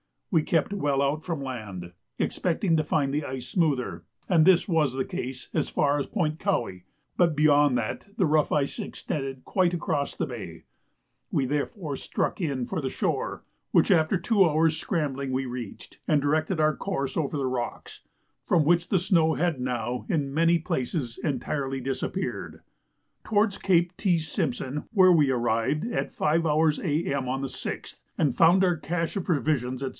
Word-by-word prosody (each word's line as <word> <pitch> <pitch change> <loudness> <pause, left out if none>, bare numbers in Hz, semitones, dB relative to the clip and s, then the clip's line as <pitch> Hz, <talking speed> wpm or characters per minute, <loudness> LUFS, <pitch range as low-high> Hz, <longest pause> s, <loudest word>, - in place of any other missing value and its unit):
We 165 -5 +4
kept 165 +5 +1
well 145 -8 0
out 145 +3 0
from 165 -6 -3
land, 105 -9 -6 0.3
expecting 170 -1 0
to 155 - +2
find 140 -2 0
the 150 0 -1
ice 130 -1 -5
smoother; 150 -8 0 0.2
and 165 -4 +5
this 185 -2 +5
was 155 -7 +2
the 130 0 -1
case 130 +1 -5
as - - 0
far 145 0 +1
as 140 - -3
Point 160 -6 -1
Cowie; 95 - -1 0.3
but 170 -3 +3
beyond 145 -3 +4
that 115 - -3
the 190 - +3
rough 155 -1 +2
ice 140 -2 0
extended 135 -3 -5
quite 180 -3 +1
across 145 -4 -2
the - - -1
bay; 100 - -8 0.7
we 135 - +1
therefore 145 - -3
struck - - -2
in 140 -7 -1
for - - -3
the 130 - -2
shore, - - -2 0.3
which - - +4
after 160 +4 +3
two 195 +3 +3
hours' 160 0 +2
scrambling 140 -7 -2
we 130 +1 0
reached, 120 -4 -8
and 150 -2 +3
directed 155 +4 +1
our 155 0 +3
course 140 -9 -3
over 150 -2 -1
the 135 - -1
rocks, 125 -2 -4 0.4
from 165 - +3
which 170 +3 +3
the 190 - +2
snow 165 -3 +3
had 170 -5 0
now, 125 -1 -2
in 145 -8 -1
many 165 +2 +4
places, 130 -5 -3
entirely 135 -2 -2
disappeared, 135 +8 -4 0.6
towards 205 -1 +2
Cape 175 -2 +2
T. 185 -4 +2
Simpson, 150 - -2
where 185 -3 +6
we 150 -5 +4
arrived 120 - 0
at - - -1
5h. 155 0 +1
A.M. 145 -5 -1
on 135 +2 -2
the 135 - -2
6th, 130 - -5 0.2
and 145 -5 +2
found 175 +3 +5
our 180 -3 +2
"cache" 165 +4 -2
of 190 - -3
provisions, 135 -6 0
&c. 135 - -2
150 Hz, 170 wpm, -26 LUFS, 135-170 Hz, 0.7 s, where